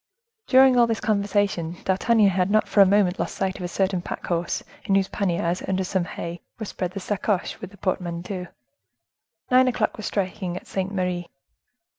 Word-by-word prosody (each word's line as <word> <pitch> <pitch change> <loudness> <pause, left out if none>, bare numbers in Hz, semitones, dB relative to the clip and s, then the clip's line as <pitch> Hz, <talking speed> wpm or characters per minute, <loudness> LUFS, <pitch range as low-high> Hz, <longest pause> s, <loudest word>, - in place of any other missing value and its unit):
During 260 -1 +6
all 235 - +6
this 225 -1 -1
conversation, 200 -5 0
D'Artagnan 205 +2 +3
had 185 0 +1
not 215 +1 +3
for 205 - +4
a 195 - +8
moment 195 -1 +3
lost - - -2
sight 190 -1 -1
of - - -9
a 180 - -2
certain 190 0 0
pack - - -6
horse, 170 0 -1 0.2
in 195 - +2
whose 195 -1 +3
panniers, 175 -3 -1
under 190 0 0
some 185 -1 -1
hay, 170 0 -6 0.2
were 220 - -5
spread 180 -2 -4
the 195 - -4
sacoches - - -11
(messenger's 205 -1 0
bags) - - -13
with - - -6
the 200 - -17
portmanteau. 180 0 -3 1.0
Nine 255 +1 +6
o'clock 240 -3 0
was 215 - -4
striking 185 -2 -2
at - - -9
Saint 190 0 -3
Merri. 180 -3 -2
190 Hz, 195 wpm, -24 LUFS, 180-205 Hz, 1.0 s, a